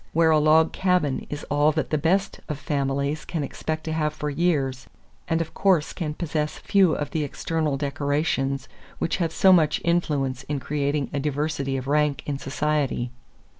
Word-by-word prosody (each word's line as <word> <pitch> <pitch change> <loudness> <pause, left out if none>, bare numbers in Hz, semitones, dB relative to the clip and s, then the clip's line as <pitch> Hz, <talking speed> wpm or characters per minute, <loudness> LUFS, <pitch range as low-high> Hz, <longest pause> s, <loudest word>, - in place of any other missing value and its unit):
Where 165 0 +4
a 155 - +5
log 155 +1 +4
cabin 180 -8 +1
is 145 0 -5
all 145 +1 +4
that 155 - -2
the 155 - +2
best 190 +6 +1
of 150 - -2
families 140 0 -1
can 160 -4 -3
expect 155 +3 -4
to 160 - -4
have 155 -1 0
for 150 -1 -3
years 140 -6 0 0.4
and 165 -1 +1
of 165 - -5
course 185 -6 +2
can 155 -4 -4
possess 150 -3 -2
few 190 -5 +3
of 145 - -3
the 155 - 0
external 150 0 -1
decorations 140 -1 -1 0.3
which - - -1
have 170 -3 0
so 190 -1 +5
much 155 -4 +3
influence 145 -7 0
in 145 -1 -2
creating 145 0 -1
a 145 - 0
diversity 145 -1 -1
of 130 - -5
rank 145 -1 +1
in 140 -2 -3
society. 140 -3 -1
150 Hz, 175 wpm, -25 LUFS, 140-160 Hz, 0.4 s, a